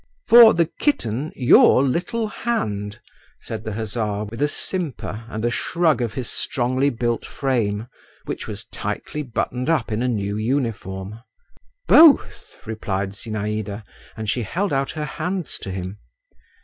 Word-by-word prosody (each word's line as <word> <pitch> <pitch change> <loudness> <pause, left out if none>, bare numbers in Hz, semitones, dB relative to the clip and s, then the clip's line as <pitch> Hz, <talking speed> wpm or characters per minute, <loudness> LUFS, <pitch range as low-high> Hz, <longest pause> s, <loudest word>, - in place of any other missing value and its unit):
"For 235 -1 +9
the 170 0 +3
kitten—your 135 - +3
little 200 - -1
hand," 105 - -3 0.4
said 110 -1 -6
the 110 - -4
hussar, 105 -1 -2
with 115 +4 -7
a 145 - +4
simper 145 - -4
and 110 0 -3
a 120 - +1
shrug 160 0 +1
of 115 -4 -2
his 125 -4 -3
strongly 130 +2 0
built 120 -2 -1
frame, 115 -6 -1 0.4
which - - -5
was - - -6
tightly 150 - -4
buttoned 125 0 -2
up 150 -8 +1
in 110 +2 -1
a 125 - +1
new 100 -4 -1
uniform. 110 -4 -2 0.7
"Both," 315 -3 +5
replied 100 -3 -3
Zinaïda, 105 0 -4 0.3
and 110 -1 -5
she 120 +4 0
held 175 - -2
out 135 0 0
her 155 -1 -4
hands 180 +2 -4
to - - -7
him. 95 +2 -5
120 Hz, 140 wpm, -22 LUFS, 105-150 Hz, 0.7 s, For